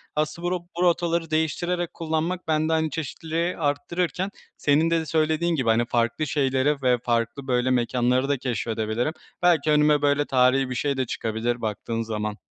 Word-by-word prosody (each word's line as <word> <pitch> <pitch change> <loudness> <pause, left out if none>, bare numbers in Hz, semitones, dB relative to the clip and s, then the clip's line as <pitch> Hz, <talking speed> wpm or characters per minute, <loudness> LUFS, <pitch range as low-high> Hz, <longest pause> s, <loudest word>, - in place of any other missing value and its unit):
Asıl 155 +2 -1
bu 175 - 0
ro 180 - 0 0.2
bu 175 - +1
rotaları 170 -2 +1
değiştirerek 175 +2 -1
kullanmak, 165 +2 -2
bende, 155 0 +1
hani, 160 0 +1
çeşitliliği 165 +3 -3
arttırırken 165 +4 -1 0.3
senin 150 +3 +3
de 165 0 +2
de 160 - -4
söylediğin 160 +2 +1
gibi, 130 -6 0
hani, 115 +1 +3
farklı 120 +6 0
şeylere 135 +1 +1
ve 125 -1 +3
farklı 120 +3 -1
böyle 125 0 +1
mekânları 125 +2 +1
da 145 - +2
keşfedebilirim. 115 +1 -2 0.3
Belki 165 -4 +3
önüme, 150 0 +4
böyle, 145 0 +2
tarihî 130 0 +3
bir 125 - -3
şey 140 +2 -1
de 130 - 0
çıkabilir, 115 +1 -2
baktığın 115 +1 -3
zaman. 105 -2 -3
145 Hz, 170 wpm, -24 LUFS, 125-160 Hz, 0.3 s, önüme